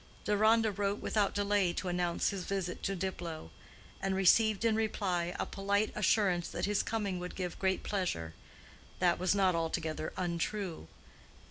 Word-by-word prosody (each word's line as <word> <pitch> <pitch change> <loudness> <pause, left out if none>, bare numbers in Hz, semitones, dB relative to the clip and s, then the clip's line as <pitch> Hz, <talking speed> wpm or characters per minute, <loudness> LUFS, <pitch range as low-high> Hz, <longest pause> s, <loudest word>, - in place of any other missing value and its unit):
Deronda 215 +2 +4
wrote 200 +1 -1
without 205 -2 0
delay 205 -3 +2
to 185 - -4
announce 175 -1 0
his 195 -2 -4
visit 190 -2 -3
to 195 - -1
Diplow, 170 - -5 0.5
and 195 0 0
received 215 +3 +4
in 225 -1 +3
reply 185 -5 -1
a - - 0
polite 200 +2 0
assurance 190 -4 +2
that - - -2
his 205 0 +1
coming 200 -5 -2
would 180 0 -6
give 180 -2 -4
great 190 -1 0
pleasure. 175 - -2 0.6
That 175 -1 +2
was 185 +2 +2
not 190 -2 +3
altogether 160 -1 -2
untrue. 175 - -2
190 Hz, 150 wpm, -32 LUFS, 175-205 Hz, 0.6 s, Deronda